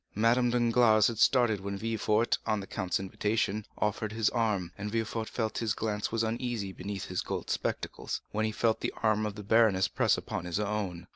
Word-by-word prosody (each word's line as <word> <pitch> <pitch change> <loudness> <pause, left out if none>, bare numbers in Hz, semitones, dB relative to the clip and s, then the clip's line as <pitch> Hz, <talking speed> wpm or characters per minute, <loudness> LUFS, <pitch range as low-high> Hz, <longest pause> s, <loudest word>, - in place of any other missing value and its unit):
Madame 120 +3 +3
Danglars 120 -2 +4
had 115 -2 -5
started 120 -6 +4
when 100 +1 -4
Villefort, 110 +1 +1
on 110 -1 +1
the 100 - -6
count's 95 -1 -2
invitation, 105 +2 -1
offered 105 0 -1
his 110 -1 +1
arm; 105 -7 0
and 105 +1 -5
Villefort 115 0 -2
felt 110 -2 -2
that - - -3
his 110 -2 0
glance 105 -2 -2
was 115 0 0
uneasy 115 -3 -2
beneath 100 +1 -5
his 90 - -2
gold - - -4
spectacles, - - -3
when 110 - -1
he 110 - -1
felt 110 +1 +1
the - - -2
arm 110 -1 +2
of 105 - -6
the 105 - -7
baroness 105 -3 +4
press - - +2
upon - - -4
his 90 +2 -2
own. 100 -5 -2
110 Hz, 200 wpm, -30 LUFS, 100-115 Hz, -, Danglars